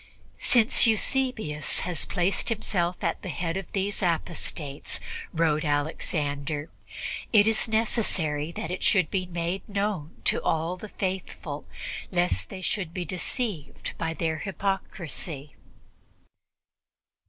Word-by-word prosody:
"Since 240 0 +6
Eusebius 220 - +1
has 175 -3 0
placed 185 +4 +1
himself 180 -5 0
at - - 0
the 185 - -5
head 165 +1 -2
of 195 -2 -4
these 200 +1 -1
apostates," 165 -4 -1 0.3
wrote 160 -2 +2
Alexander, 145 0 -1 0.6
"it 210 -2 +7
is 225 +1 +3
necessary 190 -9 +1
that 160 - -4
it 185 - -3
should 185 -7 +4
be 185 -2 0
made 175 +2 -2
known 200 -6 -2
to - - +2
all 165 +2 +1
the 210 +3 -8
faithful, 185 -7 -3 0.4
lest 175 -1 +1
they 190 -2 -6
should 180 -5 -1
be 180 -2 -2
deceived 185 - -2
by 165 0 -1
their 160 -2 0
hypocrisy." 175 -6 -3
175 Hz, 120 wpm, -27 LUFS, 155-200 Hz, 0.6 s, it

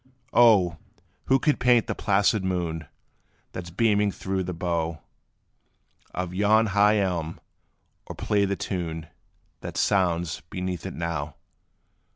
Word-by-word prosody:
O! 100 -9 +5 0.5
who 135 - +4
could 150 +2 +1
paint 125 -2 +4
the - - -2
placid 100 0 +2
moon, 85 -4 -2 0.6
That 90 -2 -7
's - - -8
beaming 105 +2 +2
through 95 0 -3
the 90 - -4
bough 85 -2 -2 1.1
Of 90 -1 -4
yon 105 +3 +4
high 105 +1 +5
elm, 85 -5 -1 0.7
or - - -7
play 100 -1 +1
the 100 0 -1
tune, 85 -5 -4 0.5
That - - -7
sounds 85 -5 +1
beneath 90 -1 -4
it 95 - -7
now? 80 -4 -3
90 Hz, 130 wpm, -25 LUFS, 85-105 Hz, 1.1 s, O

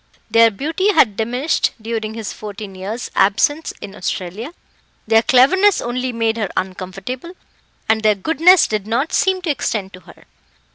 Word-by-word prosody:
Their 230 0 +6
beauty 320 - -1
had 225 - +4
diminished 245 +8 0
during 220 -1 -4
his 225 -3 -5
fourteen 205 -1 -8
years' 200 +6 -6
absence 290 +11 +2
in 195 - -8
Australia; 195 - -5 0.5
their 225 0 +4
cleverness 350 - +4
only 250 +1 -3
made 230 -1 -1
her 210 -4 -2
uncomfortable; 190 - -5 0.5
and 220 0 +2
their 215 -1 +3
goodness 325 - +4
did 215 -1 -3
not 240 +8 -1
seem 380 -3 +1
to 335 - 0
extend 210 -7 -3
to 185 - -11
her. - - -17
225 Hz, 150 wpm, -18 LUFS, 205-290 Hz, 0.5 s, Their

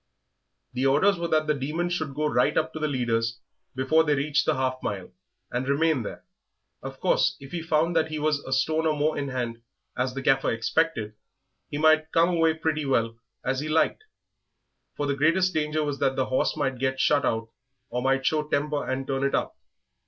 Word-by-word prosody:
The 130 +2 +1
orders 170 +8 +3
were 170 - -1
that 155 -1 +2
the 150 - +2
Demon 150 +5 -2
should 160 -6 -3
go 150 +1 -1
right 150 - +2
up 160 +1 0
to 155 - -5
the 155 - 0
leaders 115 -4 -1 0.4
before 155 +5 +3
they 150 -2 +2
reached 145 +2 0
the - - +3
half 130 0 -1
mile, 95 -3 -4 0.4
and 125 +2 -2
remain 155 -1 +2
there. 110 - -7 0.6
Of - - -8
course, - - +2
if 135 0 -12
he 175 - -3
found 165 +1 +1
that 160 -1 +3
he 155 -1 -4
was 150 -1 +1
a 130 - -9
stone 155 +5 +1
or 155 -1 +1
more 150 +1 +1
in 140 -1 -2
hand, 120 -3 -4 0.3
as 130 0 -1
the 135 - -4
Gaffer 135 -1 +3
expected, 115 -1 0 0.6
he 145 - -4
might 155 +1 +3
come 165 +1 +4
away 165 -2 +2
pretty 160 -1 -1
well 115 -4 0 0.3
as 130 0 0
he 150 +2 -4
liked, 160 - +1 0.9
for 145 - -1
the 140 - 0
greatest 175 +6 +2
danger 155 0 0
was 145 -2 -3
that 135 - +1
the 130 - +1
horse 130 +4 0
might 135 -4 -1
get 130 0 -1
shut 145 +1 +3
out 115 0 -1 0.4
or 125 +1 -1
might 135 +1 +1
show 155 +1 +2
temper 145 0 0
and 135 +1 -2
turn 135 0 -2
it 140 - +1
up. - - -2
145 Hz, 205 wpm, -26 LUFS, 130-155 Hz, 0.9 s, come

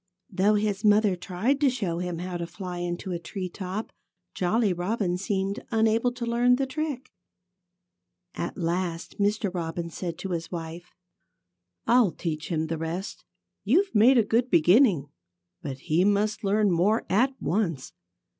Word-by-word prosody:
Though 200 +3 +3
his 205 -1 -1
mother 210 -2 +4
tried 200 +11 -1
to 285 - +5
show 195 -9 -2
him 180 -1 -3
how 180 +1 -4
to 170 -1 -4
fly 180 -2 -6
into 175 +2 -4
a 175 - -2
tree 185 +2 -5
top, 190 +4 -5 0.4
Jolly 200 +2 +1
Robin 180 +1 -1
seemed 195 +1 -2
unable 225 +1 +2
to 245 -1 -5
learn 240 +1 +3
the 270 +1 0
trick. 280 -1 -4 1.2
At 170 - -4
last 170 0 -3
Mr. 205 -1 +1
Robin 170 -1 -4
said 170 -1 -5
to 190 +2 -6
his 165 -1 -3
wife: 170 0 -6 1.0
"I'll 235 -3 +5
teach 160 -2 -5
him 160 -2 0
the 160 0 -3
rest. 170 +4 -5 0.4
You've 390 +1 +2
made 240 +5 +6
a 230 - +5
good 235 +4 +1
beginning. 175 - +4 0.5
But 135 -3 -5
he 165 +4 +2
must 205 +2 +1
learn 205 0 +2
more 195 +7 +2
at 260 +7 +1
once. 170 -8 -1
195 Hz, 155 wpm, -26 LUFS, 175-220 Hz, 1.2 s, made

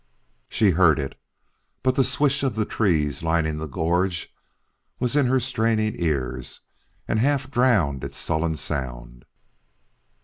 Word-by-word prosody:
She 105 -3 +3
heard 80 -3 +4
it, 70 -2 -3 0.7
but 130 - +3
the 135 - +3
swish 140 +1 +1
of 135 -4 -1
the 110 -1 0
trees 80 - 0
lining 80 -1 0
the 80 +1 -4
gorge 85 +3 -1 0.7
was 125 +1 -1
in 145 -3 +4
her 130 +1 +3
straining 110 -3 0
ears 65 -6 -3 0.5
and 110 - +1
half 135 +1 +1
drowned 105 - +2
its - - -6
sullen 80 0 -1
sound. 60 -4 -5
90 Hz, 135 wpm, -24 LUFS, 75-125 Hz, 0.7 s, heard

